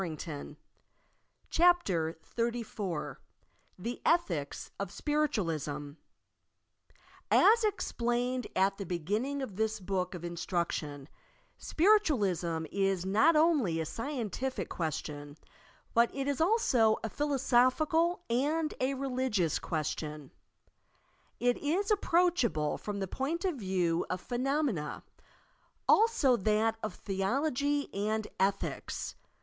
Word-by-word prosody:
i - - 0
I 150 -2 -7 1.0
CHAPTER 200 - +3 0.2
XXXIV 230 -7 -2 0.6
THE 235 +7 -5
ETHICS 170 - 0
OF 200 -2 -3
SPIRITUALISM 165 - -1 1.3
As 455 +2 +6
explaioed 245 - -1
at 195 +1 +2
the 200 - -4
beginning 210 - -2
of 200 -7 -7
this 220 0 0
Book 185 -1 -2
of 175 - -8
Instruc 170 0 -2
tion, 145 -2 -5 0.5
SpiritualiBtii 205 - +2
is 195 -2 0
not 220 - +4
only 300 - +3
a 160 - -1
scientific 255 - -3
question, 145 -2 -4 0.6
but 235 0 +4
it 275 0 -2
is 285 +1 0
also 265 - +3
a - - 0
philosophical 295 +5 +2
and 300 +6 0
a 265 +2 +1
religious 255 - 0
question. 150 -2 -4 1.1
It 245 +1 +2
is 365 +8 0
approachable 335 - +2
from 205 -1 -4
the 195 - -1
point 305 - -2
of 355 -6 0
view 180 -5 0
of 185 - -2
phenomena; 250 - -1 0.8
also 420 - +4
that 220 +2 +1
of 215 -4 -4
theology 275 +8 -1
and 215 +2 -1
ethics. 195 +1 -1
225 Hz, 105 wpm, -31 LUFS, 180-285 Hz, 1.3 s, As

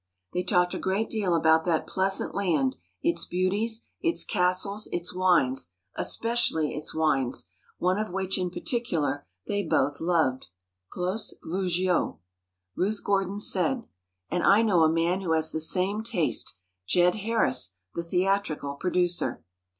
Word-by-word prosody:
They 180 - 0
talked 180 -1 +2
a - - -3
great 195 +4 -1
deal 200 -6 +1
about 160 0 +4
that 165 -3 +1
pleasant 190 +1 0
land, 160 -10 +1 0.3
its 170 0 +2
beauties, 205 +6 -1 0.2
its 340 0 +1
castles, 200 +2 0
its 175 +1 -2
wines—especially 160 - +1
its 150 +1 -4
wines—one 135 - -1
of 215 - -2
which 190 +1 -1
in 180 -1 0
particular, 165 - -2 0.2
they 205 - -1
both 145 -5 +1
loved, 160 -7 +1 0.4
Clos 185 +5 -3
Veugeot. 180 0 0 0.6
Ruth 200 +3 -1
Gordon 195 0 0
said: 210 +5 +1 0.5
"And 175 +1 0
I 205 +3 +6
know 195 -7 +3
a 160 - +5
man 170 +3 +1
who 170 -4 0
has 160 0 0
the 160 - -2
same 185 +6 +1
taste: 175 - -1 0.3
Jed 175 0 +4
Harris, 130 - 0 0.2
the 170 - -2
theatrical 180 -5 0
producer." 180 +1 0
180 Hz, 135 wpm, -27 LUFS, 160-195 Hz, 0.6 s, I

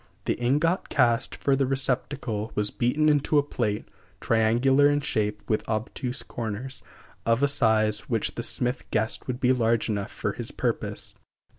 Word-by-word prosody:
The - - +2
ingot 150 +9 +1
cast 120 -3 +2
for 140 - +1
the 135 -1 +1
receptacle 125 -4 -2
was 105 0 0
beaten 145 +6 +1
into 150 0 +3
a 145 - +5
plate 110 -7 -2 0.3
(triangular 120 +6 +3
in 145 0 +1
shape, 105 -5 -2
with 110 - 0
obtuse 120 +4 -3
corners), 120 +4 -5 0.4
of 115 +4 +2
a - - +6
size 110 -5 +2
which - - 0
the - - -4
smith 125 +1 -2
guessed 110 0 -1
would 125 -1 -3
be 130 0 +4
large 115 -2 +1
enough 100 -2 -2
for - - -3
his - - -5
purpose. - - -3
120 Hz, 160 wpm, -26 LUFS, 110-135 Hz, 0.4 s, a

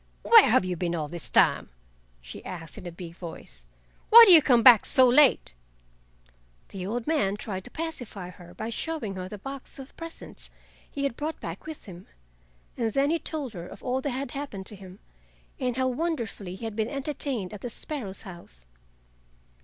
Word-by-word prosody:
"Where 455 -3 +7
have 230 -4 +3
you 180 -1 -2
been 175 0 -2
all 155 -3 -3
this 170 +2 -6
time?" - - +3 0.5
she - - -10
asked 165 -4 -8
in 180 - -9
a - - -6
big 170 0 -10
voice. 60 - -11 0.4
"Why 465 +1 +11
do 390 - +7
you 325 - +9
come 245 -4 +3
back 240 -4 +9
so 260 -1 +5
late?" 255 - +4 1.2
The 190 -1 -6
old 235 +2 -3
man 210 -11 0
tried 190 -3 -6
to - - -8
pacify 245 - -6
her 175 0 -15
by 225 - -5
showing 290 -5 -3
her 185 -1 -6
the 210 - -7
box 270 +5 -7
of 270 0 -11
presents 330 0 -10 0.4
he 280 - -5
had 275 -4 -1
brought 310 +4 -4
back 170 - -8
with 315 -1 -8
him, 180 -2 -12 0.7
and 225 -2 -1
then 280 +2 +2
he 335 - +1
told 290 -9 -4
her 175 -2 -8
of - - -13
all 255 +1 -1
that 285 - -2
had 265 0 -4
happened 275 -9 -6
to 210 - -8
him, 190 -1 -12 0.6
and 250 -2 -2
how 260 0 +1
wonderfully 245 - -3
he 225 - -8
had 220 -2 -5
been 220 +1 -1
entertained 275 -8 -4
at 205 - -9
the 245 - -5
sparrow's 230 -5 -7
house. 170 - -13
230 Hz, 195 wpm, -27 LUFS, 185-275 Hz, 1.2 s, Why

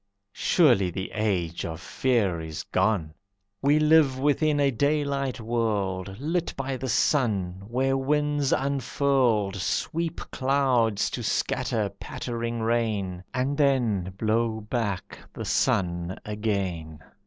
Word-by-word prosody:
Surely 120 - +3
the 95 +2 -5
age 95 -6 -1
of 80 0 -5
fear 100 -4 0
is 80 0 -6
gone. 95 -5 0 0.5
We 145 +2 +4
live 155 -3 +4
within 145 +2 +2
a 140 -1 +3
daylight 140 0 0
world 105 -5 -1
Lit 165 +5 -1
by 135 0 -2
the 130 0 -4
sun, 100 - +1
where 130 +3 +1
winds 145 +1 +1
unfurled 130 -6 +1
Sweep 165 - -2
clouds 130 -6 +1
to - - -4
scatter 110 -3 0
pattering 115 -1 -4
rain, 110 -6 -1
And 135 +2 -1
then 120 -10 +2
blow 110 +1 0
back 105 -3 -3
the 110 - -6
sun 95 -4 0
again. 100 -7 -2
115 Hz, 115 wpm, -26 LUFS, 100-135 Hz, 0.5 s, We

